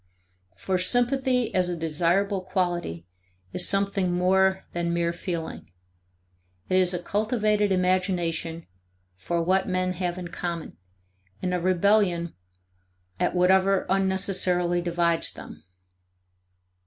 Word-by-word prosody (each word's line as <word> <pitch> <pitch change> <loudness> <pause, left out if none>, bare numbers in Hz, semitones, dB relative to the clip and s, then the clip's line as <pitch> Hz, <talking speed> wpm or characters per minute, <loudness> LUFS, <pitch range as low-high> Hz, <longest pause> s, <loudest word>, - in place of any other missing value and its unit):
For 185 -1 -1
sympathy 250 +4 +1
as 180 -1 +1
a 175 - -3
desirable 175 +5 0
quality 175 - -2 0.5
is 180 - +2
something 195 -2 +1
more 190 +2 +2
than 170 0 -1
mere 170 0 0
feeling; 170 - -5 1.0
it 185 - +3
is 180 -1 +2
a - - 0
cultivated 210 +1 0
imagination 180 -3 0 0.5
for 170 - -2
what 190 +2 +1
men 185 0 0
have 180 0 -3
in 180 -1 -6
common 170 -1 -5 0.7
and 180 - 0
a 180 - +1
rebellion 185 -1 +2 0.9
at - - 0
whatever 190 +2 +3
unnecessarily 190 -2 +1
divides 170 -1 0
them. - - -11
185 Hz, 110 wpm, -26 LUFS, 175-190 Hz, 1.0 s, it